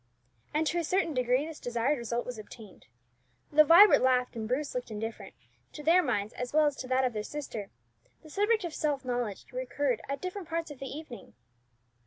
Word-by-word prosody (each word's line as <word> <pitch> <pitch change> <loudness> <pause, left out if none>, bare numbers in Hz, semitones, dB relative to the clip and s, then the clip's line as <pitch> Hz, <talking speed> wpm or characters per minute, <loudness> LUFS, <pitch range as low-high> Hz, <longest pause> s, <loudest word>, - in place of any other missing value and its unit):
And 310 +2 +1
to 325 +3 0
a - - -1
certain 350 0 0
degree 250 +2 +1
this 320 -1 -8
desired 245 +4 0
result 235 0 -2
was 245 -3 -6
obtained. 215 -1 -13 0.6
Though 305 +1 +7
Vibert 345 +7 +8
laughed, 250 -1 +2
and 220 -1 -4
Bruce 275 +5 -1
looked 250 -1 -4
indifferent, 220 -1 -6 0.4
to 300 - -8
their 335 +4 +5
minds, 215 - -1
as 250 +1 -5
well 310 0 +5
as 290 -1 +1
to 255 - -6
that 260 +1 +2
of 250 - -1
their 210 - -2
sister, 230 -5 -6 0.5
the 310 - -13
subject 420 +4 +2
of 340 -3 -4
self 290 -4 -1
knowledge 245 -5 -3
recurred 255 -1 -1
at 280 0 -2
different 370 -1 -5
parts 330 -1 -3
of 285 - -10
the 275 - -5
evening. 280 -3 -9
265 Hz, 200 wpm, -30 LUFS, 240-310 Hz, 0.6 s, Vibert